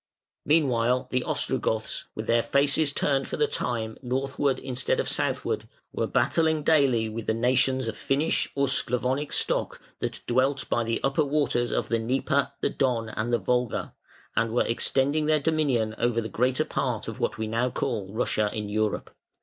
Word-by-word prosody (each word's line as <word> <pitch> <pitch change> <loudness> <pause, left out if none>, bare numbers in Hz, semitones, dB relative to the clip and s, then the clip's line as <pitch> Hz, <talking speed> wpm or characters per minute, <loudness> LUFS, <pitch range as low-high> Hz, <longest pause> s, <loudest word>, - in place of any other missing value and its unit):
Meanwhile 125 -5 +2
the 125 0 +1
Ostrogoths, 110 -4 0
with 110 - -4
their 115 +1 +3
faces 140 +3 +2
turned 140 -1 0
for - - -4
the 450 - +3
time 115 - -3
northward 135 +1 -1
instead 130 -1 -1
of - - -1
southward, - - -1 0.3
were - - -1
battling 160 -2 +2
daily 135 -8 +3
with 110 0 -6
the 110 - +1
nations 130 +1 +2
of 110 - -3
Finnish 145 +4 0
or 140 0 +2
Sclavonic 130 +2 0
stock - - 0 0.2
that - - -3
dwelt 130 +3 +1
by 120 - +1
the 115 0 -1
upper 135 +3 +2
waters 140 -4 0
of - - -1
the 115 - +1
Dnieper, 135 +4 0
the - - +1
Don, 120 -5 0
and 110 +2 -3
the 120 - +4
Volga, 125 -1 -1 0.4
and 115 0 +1
were 120 - +2
extending 140 +5 +1
their 155 -1 +3
dominion 140 -8 +1
over 120 -1 +1
the 110 -1 -3
greater 125 +5 +1
part - - -2
of - - -6
what - - -1
we 110 - -2
now 115 +3 0
call 105 -5 -3
Russia 110 -1 0
in 105 -1 -4
Europe. 105 0 -1
125 Hz, 175 wpm, -26 LUFS, 115-140 Hz, 0.4 s, the